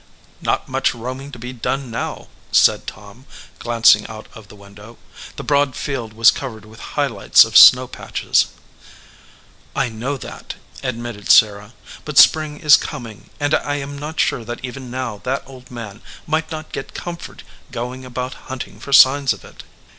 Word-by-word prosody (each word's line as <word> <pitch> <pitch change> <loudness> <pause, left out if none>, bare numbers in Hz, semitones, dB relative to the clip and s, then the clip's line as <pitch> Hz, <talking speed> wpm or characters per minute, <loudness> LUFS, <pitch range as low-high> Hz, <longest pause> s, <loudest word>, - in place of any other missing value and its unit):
"Not - - -1
much 130 -1 0
roaming 130 +4 -7
to 125 - -9
be 125 +2 -7
done 130 +1 -3
now/ 115 - -5 0.2
said - - +3
Tom, 105 +5 -11 0.3
glancing 115 -3 +4
out 110 0 -10
of 110 -4 -13
the - - -15
window. 105 +3 -15 0.4
The - - -7
broad 140 -2 +1
field 125 -6 -4
was 115 +2 +6
covered 110 -6 -7
with 110 +1 -15 0.2
high 145 - +3
lights 115 -8 +4
of - - -9
snow - - +9
patches. - - 0 1.3
"I 135 -2 0
know 120 +6 -4
that," - - -9 0.3
admitted 120 -4 -6
Sarah; 105 0 +4 0.3
"but 150 -3 -6
spring 155 -1 +5
is 150 -3 +7
coming, 115 -4 -8
and 145 +1 0
I 145 -2 0
am 145 0 -5
not 150 +3 -7
sure 120 - +1
that 120 +2 -6
even 130 0 -8
now 125 -4 -5
that 130 +2 -2
old 130 -1 -14
man 110 -4 -9 0.2
might 160 0 -1
not 155 -1 -7
get - - -7
comfort 170 -1 -8 0.3
going 125 +1 -6
about 125 0 -5 0.2
hunting 130 -1 -7
for 140 - -9
signs 140 0 +6
of - - -14
it." - - -13
125 Hz, 170 wpm, -19 LUFS, 115-140 Hz, 1.3 s, snow